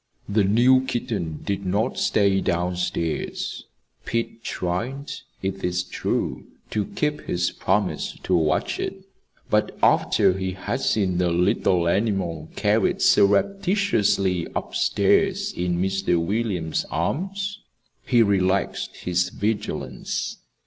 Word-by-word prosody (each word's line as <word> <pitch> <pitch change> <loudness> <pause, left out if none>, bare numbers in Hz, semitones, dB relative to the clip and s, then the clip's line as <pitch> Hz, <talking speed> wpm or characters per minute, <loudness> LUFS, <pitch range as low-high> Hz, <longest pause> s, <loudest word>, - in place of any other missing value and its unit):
The 105 +1 +2
new 125 +6 +5
kitten 105 -11 -3
did 100 -1 -2
not 100 +6 0
stay 100 -2 +2
down 90 +1 0
stairs. 85 -2 -3 0.4
Pete 115 0 -3
tried, 125 +11 -3 0.3
it 95 0 -3
is 90 0 0
true, - - -2 0.2
to 105 -2 0
keep 150 +6 -2
his 90 0 0
promise 95 +1 -1
to 95 - +1
watch 80 -3 +1
it; - - -4 0.5
but - - +1
after - - +4
he 95 0 -3
had 95 - -3
seen 95 -4 +1
the 90 -1 +2
little 85 0 +2
animal 90 -5 0
carried - - +2
surreptitiously 105 - +2
up - - -3
stairs - - +2
in 90 0 -1
Mr. 95 -2 +1
William's 90 -3 -1
arms, 195 - -2 0.4
he 120 -3 +4
relaxed 95 -2 0
his 90 0 +1
vigilance. 75 - -3
95 Hz, 115 wpm, -24 LUFS, 90-110 Hz, 0.5 s, new